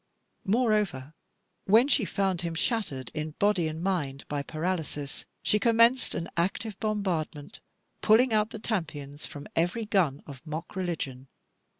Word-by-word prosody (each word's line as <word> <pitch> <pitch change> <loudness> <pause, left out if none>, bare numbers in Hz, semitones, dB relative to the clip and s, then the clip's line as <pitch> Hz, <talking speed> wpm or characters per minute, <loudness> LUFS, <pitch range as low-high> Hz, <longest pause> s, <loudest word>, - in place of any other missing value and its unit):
Moreover, 210 - +1 0.5
when 225 +6 +6
she 275 -6 +3
found 190 -2 0
him 170 -1 -3
shattered 165 - -1
in 155 0 -4
body 200 -5 +3
and 160 +2 -5
mind 150 -8 -1
by 145 -1 -2
paralysis, 155 -2 -3 0.2
she 210 - +3
commenced 230 +3 +4
an 165 - -3
active 195 +5 -1
bombardment, 180 -9 -2 0.4
pulling 225 +3 +5
out 215 0 +3
the 220 - -6
tompions 155 -9 -4
from 145 -1 -9
every 175 +7 +1
gun 175 -10 +1
of 140 -3 -10
mock 160 +2 -6
religion. 150 -8 -3
175 Hz, 135 wpm, -28 LUFS, 150-215 Hz, 0.5 s, when